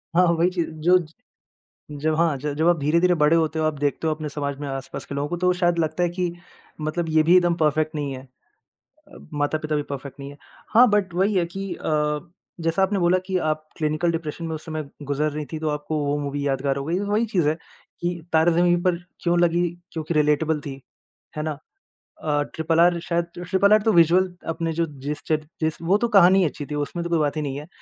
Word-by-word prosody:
हाँ 180 Hz, +1 st, +6 dB
वही 175 Hz, +2 st, +3 dB
चीज़, 175 Hz, -3 st, -2 dB
जो 165 Hz, +4 st, +3 dB, 1.0 s
जब 155 Hz, +1 st, +1 dB
हाँ 165 Hz, -3 st, +2 dB
ज 145 Hz, +2 st, -3 dB
जब 165 Hz, +2 st, +3 dB
आप 175 Hz, -, +3 dB
धीरे-धीरे 170 Hz, +5 st, +3 dB
बड़े 155 Hz, 0 st, +4 dB
होते 160 Hz, -1 st, 0 dB
हो, 155 Hz, -, +1 dB
आप 155 Hz, -1 st, +1 dB
देखते 145 Hz, +3 st, -1 dB
हो 155 Hz, -, +2 dB
अपने 155 Hz, 0 st, -5 dB
समाज 140 Hz, -1 st, -3 dB
में 145 Hz, -, -4 dB
आसपास 135 Hz, 0 st, -6 dB
के -, -, -7 dB
लोगों 140 Hz, +1 st, -2 dB
को, 175 Hz, -, -2 dB
तो 180 Hz, +1 st, +2 dB
शायद 175 Hz, -1 st, +1 dB
लगता 160 Hz, +1 st, 0 dB
है 175 Hz, -, +3 dB
कि 175 Hz, -1 st, -2 dB, 0.5 s
मतलब 160 Hz, +2 st, -2 dB
ये 155 Hz, 0 st, +4 dB
भी 175 Hz, +3 st, +5 dB
एकदम 175 Hz, -1 st, +4 dB
पर्फेक्ट 155 Hz, 0 st, +1 dB
नहीं 145 Hz, -2 st, -2 dB
है। 130 Hz, 0 st, -7 dB, 0.9 s
अ, -, -, -14 dB, 0.2 s
माता-पिता 155 Hz, +1 st, -1 dB
भी 150 Hz, -, +1 dB
पर्फेक्ट 140 Hz, 0 st, -7 dB
नहीं 140 Hz, -, -7 dB
है। 145 Hz, -, -12 dB, 0.4 s
हाँ 245 Hz, +3 st, +8 dB
बट 205 Hz, -4 st, +1 dB
वही 195 Hz, +4 st, +2 dB
है 175 Hz, -2 st, +2 dB
कि 195 Hz, -1 st, -4 dB
अ, 150 Hz, -1 st, 0 dB, 0.4 s
जैसा 165 Hz, +3 st, 0 dB
आपने 195 Hz, 0 st, +1 dB
बोला 175 Hz, +1 st, +3 dB
कि 185 Hz, -1 st, 0 dB
आप 155 Hz, -2 st, -2 dB
क्लिनिकल 155 Hz, +2 st, 0 dB
डिप्रेशन 165 Hz, 0 st, -4 dB
में 160 Hz, -1 st, -3 dB
उस 155 Hz, -, -9 dB
समय 155 Hz, -3 st, -5 dB
गुज़र 145 Hz, +1 st, -1 dB
रही 150 Hz, 0 st, -4 dB
थीं, 155 Hz, -, -3 dB
तो 155 Hz, -1 st, -1 dB
आपको 150 Hz, +1 st, -2 dB
वो 145 Hz, +1 st, 0 dB
मूवी 145 Hz, 0 st, -2 dB
यादगार 135 Hz, 0 st, 0 dB
हो 140 Hz, -, -4 dB
गयी। 175 Hz, +4 st, 0 dB
वही 210 Hz, +3 st, +1 dB
चीज़ 180 Hz, -9 st, +1 dB
है 155 Hz, -, 0 dB, 0.5 s
कि 175 Hz, -1 st, -2 dB
तारे 160 Hz, +2 st, +5 dB
ज़मीन 175 Hz, +1 st, +3 dB
पर 180 Hz, -2 st, +3 dB, 0.3 s
क्यों 175 Hz, 0 st, +2 dB
लगी 175 Hz, 0 st, +2 dB, 0.2 s
क्योंकि 160 Hz, 0 st, -3 dB
रिलेटेबल 150 Hz, 0 st, +2 dB
थी। 135 Hz, -2 st, -8 dB, 0.6 s
है 150 Hz, -, -1 dB
ना? 155 Hz, -2 st, -3 dB, 0.7 s
अ, 145 Hz, -1 st, +1 dB
ट्रिपल 160 Hz, +1 st, +1 dB
आर 175 Hz, 0 st, +5 dB
शायद 170 Hz, 0 st, -1 dB
ट्रिपल 190 Hz, +3 st, +2 dB
आर 215 Hz, -1 st, +6 dB
तो 220 Hz, -, +3 dB
विजुअल 175 Hz, +2 st, +5 dB, 0.2 s
अपने 165 Hz, 0 st, -2 dB
जो 165 Hz, +1 st, 0 dB, 0.2 s
जिस 150 Hz, +2 st, -3 dB
चे 155 Hz, -, +3 dB, 0.2 s
जिस, 160 Hz, 0 st, 0 dB
वो 185 Hz, +5 st, +3 dB
तो 235 Hz, -, 0 dB
कहानी 190 Hz, -2 st, +6 dB
अच्छी 150 Hz, -1 st, -3 dB
थी -, -, -3 dB
उसमें 145 Hz, +4 st, -3 dB
तो 170 Hz, -, -4 dB
कोई 165 Hz, -, +2 dB
बात 150 Hz, 0 st, 0 dB
ही 155 Hz, -, -1 dB
नहीं 140 Hz, -2 st, -3 dB
है। 150 Hz, -, -8 dB
160 Hz, 230 wpm, -23 LUFS, 150-175 Hz, 1.0 s, हाँ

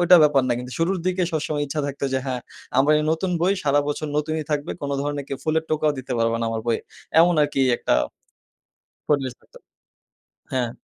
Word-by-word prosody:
ঐটা 175 Hz, +1 st, +7 dB
ব্যাপার 145 Hz, -3 st, +4 dB
না। -, -, +3 dB
কিন্তু 125 Hz, +1 st, -7 dB
শুরুর 180 Hz, +3 st, +1 dB
দিকে 185 Hz, 0 st, +1 dB
সবসময় 150 Hz, -1 st, -1 dB
ইচ্ছা 150 Hz, +2 st, -2 dB
থাকতো 140 Hz, 0 st, -4 dB
যে, 130 Hz, -, +2 dB
"হ্যাঁ, 130 Hz, -2 st, -2 dB, 0.4 s
আমার 140 Hz, +3 st, +5 dB
এই 150 Hz, -, 0 dB
নতুন 170 Hz, +3 st, -1 dB
বই 180 Hz, +3 st, +3 dB
সারা 145 Hz, 0 st, +4 dB
বছর 150 Hz, +1 st, -2 dB
নতুনই 155 Hz, +1 st, -1 dB
থাকবে। 145 Hz, -1 st, -1 dB
কোন 140 Hz, -, -2 dB
ধরনের 145 Hz, -1 st, -3 dB
কেউ 135 Hz, -, -4 dB
ফুলের 160 Hz, 0 st, +1 dB
টোকাও 155 Hz, -1 st, +2 dB
দিতে 130 Hz, 0 st, -5 dB
পারবা 115 Hz, 0 st, +2 dB
না -, -, 0 dB
আমার 115 Hz, 0 st, -2 dB
বইয়ে।" 115 Hz, -1 st, +1 dB, 0.4 s
এমন 175 Hz, +1 st, +5 dB
আরকি 145 Hz, -2 st, 0 dB, 0.2 s
একটা -, -, +1 dB, 1.1 s
পরিবেশ 135 Hz, -4 st, +1 dB
হইতো। -, -, -18 dB, 1.0 s
হ্যাঁ। 125 Hz, -2 st, +1 dB
145 Hz, 195 wpm, -23 LUFS, 135-160 Hz, 1.1 s, ঐটা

